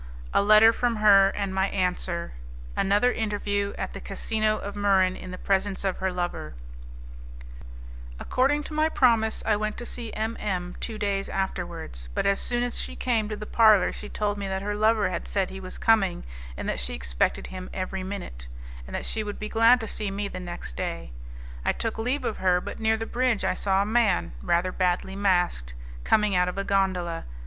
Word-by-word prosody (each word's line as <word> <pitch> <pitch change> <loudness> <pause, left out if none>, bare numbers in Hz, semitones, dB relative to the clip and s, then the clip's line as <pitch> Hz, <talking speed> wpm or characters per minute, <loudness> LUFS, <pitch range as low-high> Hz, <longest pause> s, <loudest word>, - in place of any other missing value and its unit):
A - - +4
Letter 215 +2 +7
from 240 0 0
Her, 200 -2 +6
and 200 -1 -3
My 190 0 +2
Answer 180 - -2 0.4
Another 205 +5 +3
Interview 205 -2 -1
At - - -4
the - - -7
Casino 215 +2 -1
of 200 -1 -6
Muran 195 -2 +3
In 185 - -9
the 185 - -6
Presence 195 0 0
of 190 -2 -1
Her 190 0 -1
Lover 175 - -4 1.6
According 280 +4 +1
to 305 - -8
my 310 +1 +2
promise, 230 -6 +2
I 220 - +3
went 215 0 -3
to 240 - -6
see 235 -2 -4
M 220 +1 -2
M 180 -3 -3
two 225 -2 -3
days 200 -2 -1
afterwards, 170 - -4
but - - 0
as 200 0 +2
soon 240 0 0
as 245 -1 0
she - - -6
came 225 -4 0
to 215 - -3
the 210 - -6
parlour 215 -2 +5
she 210 - -8
told 205 -1 -2
me 200 - -3
that 190 0 -3
her 205 +1 -2
lover 215 -1 +2
had 170 - -4
said 195 -2 -1
he 190 - -7
was 185 -1 -8
coming, 195 -6 +2 0.3
and - - -5
that 65 - -1
she 60 -1 -3
expected - - -1
him 185 0 -8
every 190 0 -4
minute, 185 - -7 0.4
and 65 - -6
that - - -3
she 220 - -2
would 205 -1 -5
be 215 - -5
glad 230 +2 +5
to 225 - -4
see 210 -1 -3
me 200 +1 -3
the 185 - -7
next 175 - -7
day. - - -4 0.5
I - - +2
took 225 -1 -3
leave 250 +4 -1
of 220 - -2
her, 180 -1 +3
but - - -7
near 220 0 +2
the 225 - -4
bridge 245 -2 0
I - - +2
saw 195 0 +1
a - - -4
man, 210 - +2
rather 175 - +1
badly 185 +1 0
masked, 175 - +1 0.3
coming 210 -2 +3
out 180 0 +3
of 180 - -7
a 195 - 0
gondola. 185 -4 0
200 Hz, 205 wpm, -26 LUFS, 185-220 Hz, 1.6 s, Letter